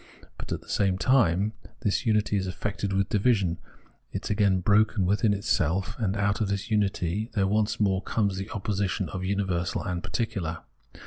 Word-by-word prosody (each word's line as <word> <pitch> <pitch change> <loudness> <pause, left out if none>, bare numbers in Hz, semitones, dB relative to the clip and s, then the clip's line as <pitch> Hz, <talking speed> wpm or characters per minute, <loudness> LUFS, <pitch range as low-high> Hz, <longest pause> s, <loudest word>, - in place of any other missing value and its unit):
But, - - -7
at - - -2
the - - -20
same 95 -2 +1
time, 105 -4 +3 0.3
this 115 +2 0
unity 105 -1 +2
is 95 -1 0
affected 100 +2 -3
with 95 0 +1
division, 100 -5 +2 0.5
is - - -4
again 100 -3 +3
broken 105 0 +3
within 105 +3 +2
itself, 95 -3 0
and 105 -3 0
out 100 +1 +1
of 105 - +1
this 100 +3 -3
unity 105 0 0
there 100 -2 +3
once 110 +2 +1
more 95 -3 +2
comes 100 -4 0
the 95 +2 -5
opposition 100 -1 -2
of 95 -1 -5
universal 95 -3 -1
and 90 -1 -3
particular. 95 -9 -3
100 Hz, 170 wpm, -27 LUFS, 95-105 Hz, 0.5 s, time